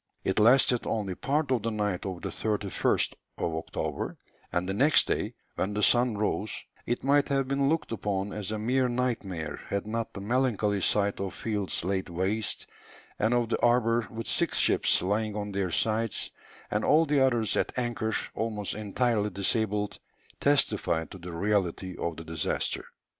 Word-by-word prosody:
It 95 - +1
lasted 125 +2 +5
only 105 -4 -1
part 145 - -1
of 125 -4 +2
the 115 - -1
night 105 -4 -1
of 90 -2 -6
the - - -2
31st 105 -3 0 0.2
October, 80 -1 -3 0.3
and 90 +1 0
the 95 - -1
next 145 +9 +5
day, - - -1 0.2
when 100 +2 -1
the 105 - 0
sun 120 -1 +4
rose, 105 0 -1 0.2
it 120 - -1
might 140 +1 +4
have 135 -1 +1
been 140 0 +1
looked 160 -4 0
upon 100 -2 -2
as 105 -1 -3
a 110 - -1
mere 125 +4 +1
nightmare 100 -11 -2
had 100 0 -2
not 115 +1 -3
the - - -6
melancholy 105 -2 +1
sight 100 +1 +1
of 95 -2 -3
fields 105 -6 -2
laid 95 0 -1
waste, 95 +5 -1 0.5
and 110 +3 +2
of 120 -2 +1
the - - 0
harbour 120 -1 +3
with 115 0 -6
six - - +2
ships - - +3
lying 105 +2 0
on 105 -1 -3
their 95 -2 -1
sides, 110 +5 0 0.4
and 105 - 0
all 160 +2 +5
the 145 -3 +3
others 120 -5 +2
at - - -1
anchor, 120 -3 -1 0.2
almost 110 -3 -2
entirely 110 0 0
disabled, 105 +1 0 0.4
testified 135 - +2
to 95 - -9
the 90 +1 -7
reality 95 0 -1
of 85 -2 -2
the 80 - -7
disaster. 80 -1 -2
105 Hz, 170 wpm, -28 LUFS, 95-120 Hz, 0.5 s, lasted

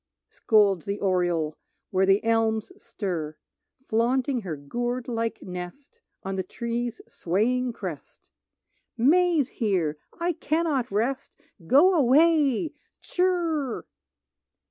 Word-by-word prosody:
scolds 200 -6 +2
the 200 +1 -2
oriole 175 -5 0 0.4
Where 190 0 +2
the 195 +1 +4
elms 225 -1 +1
stir, 165 -7 -5 0.5
Flaunting 250 +3 +1
her 175 -6 -4
gourd 240 - -3
like 230 -2 -3
nest 180 +10 -8 0.2
On 195 0 -4
the - - +1
tree's 235 +4 -4
swaying 240 +8 0
crest: - - -8 0.7
"May's 315 +2 +3
here, 175 - -1 0.2
I 345 +1 0
cannot 305 -5 0
rest, 240 +7 -2 0.3
Go 310 - +6
away; 300 0 +3 0.3
tshirr!" 335 -8 0
235 Hz, 100 wpm, -26 LUFS, 195-275 Hz, 0.7 s, Go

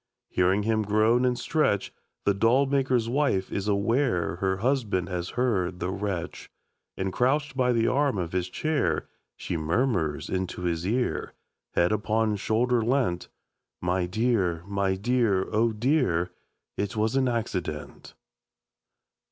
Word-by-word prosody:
Hearing 95 +3 +2
him 110 0 +1
groan 110 +4 +3
and 125 -1 +1
stretch 135 -11 0 0.3
The 100 - +4
doll 115 +7 +3
maker's 130 -4 +1
wife 125 -7 0
is 100 +1 -2
aware 100 - +1
Her 95 0 0
husband 105 -6 0
has 90 -1 -3
heard 95 -8 0
the 90 - -2
wretch, 95 -3 -4 0.5
And 95 0 -2
crouched 135 +3 +1
by 125 -1 +2
the 115 -1 +2
arm 140 -2 +2
of 85 -3 -3
his 90 0 -1
chair, 140 - -1 0.3
She 85 - -3
murmurs 80 - 0
into 95 -1 -3
his 85 0 -1
ear, 120 +4 -1 0.4
Head 85 +2 +3
upon 110 0 +1
shoulder 120 +4 +1
leant: 115 -7 0 0.5
'My 90 0 0
dear, 95 -5 0
my 100 -1 0
dear, 105 -2 +1
oh 115 +2 +2
dear, 110 - +1 0.5
It 100 0 -2
was 110 +3 0
an 135 -1 +3
accident.' 95 -10 -4
105 Hz, 135 wpm, -27 LUFS, 90-125 Hz, 0.5 s, The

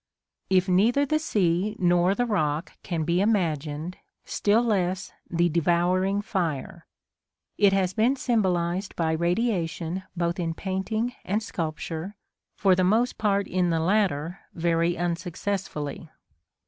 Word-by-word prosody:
If 185 0 +3
neither 225 +10 +3
the 310 +2 +1
sea 200 - +1
nor 175 +1 +3
the 245 - +1
rock 155 -7 -1
can 170 -4 -2
be 170 +3 +1
imagined, 165 -5 -1 0.3
still 215 +3 +2
less 190 -4 0 0.2
the 175 0 +2
devouring 175 +4 +1
fire. 165 -4 -3 0.7
It 200 -1 +6
has 190 -2 +1
been 235 +7 +3
symbolised 190 -7 0
by 160 -2 0
radiation 170 -1 -1 0.2
both 170 +2 -1
in 165 -2 -2
painting 215 +6 -2
and 210 +4 -1
sculpture, 165 +2 -4 0.4
for 195 -2 +4
the 185 0 +2
most 225 +7 +2
part 200 -2 +1
in 180 -1 +1
the 165 -1 +1
latter 180 -2 +1 0.2
very 170 0 +1
unsuccessfully. 170 -2 -3
180 Hz, 125 wpm, -26 LUFS, 170-205 Hz, 0.7 s, It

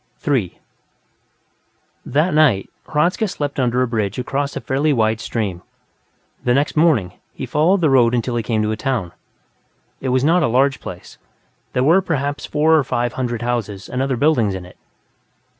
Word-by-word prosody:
3 130 - -1 1.5
That 155 +5 +1
night, 140 -11 +3 0.2
Hradzka 170 +8 +1
slept 145 -7 -4
under 125 0 +2
a - - 0
bridge 110 -4 -2
across 140 +3 -2
a - - -4
fairly 140 +3 0
wide 110 -3 +1
stream; 100 -8 -3 0.8
the 125 0 +2
next 145 +2 0
morning, 150 - +2 0.2
he - - -5
followed 175 +6 +2
the 155 - +3
road 125 -2 +4
until 120 +1 -1
he 120 - 0
came 110 -1 -1
to 105 - 0
a - - -1
town. 115 -7 -2 0.9
It 130 - -3
was 130 +1 +2
not 170 +4 +3
a 155 - +2
large 135 +3 +2
place; - - -10 0.5
there 125 - +1
were 165 +7 +5
perhaps 145 -5 -2
four 155 +2 +2
or 155 - +3
five 120 -1 -1
hundred 120 -3 -3
houses 110 -5 -3
and 130 - -3
other 135 -2 0
buildings 120 -9 +2
in 95 -1 -7
it. 90 - -16
130 Hz, 175 wpm, -19 LUFS, 115-150 Hz, 1.5 s, were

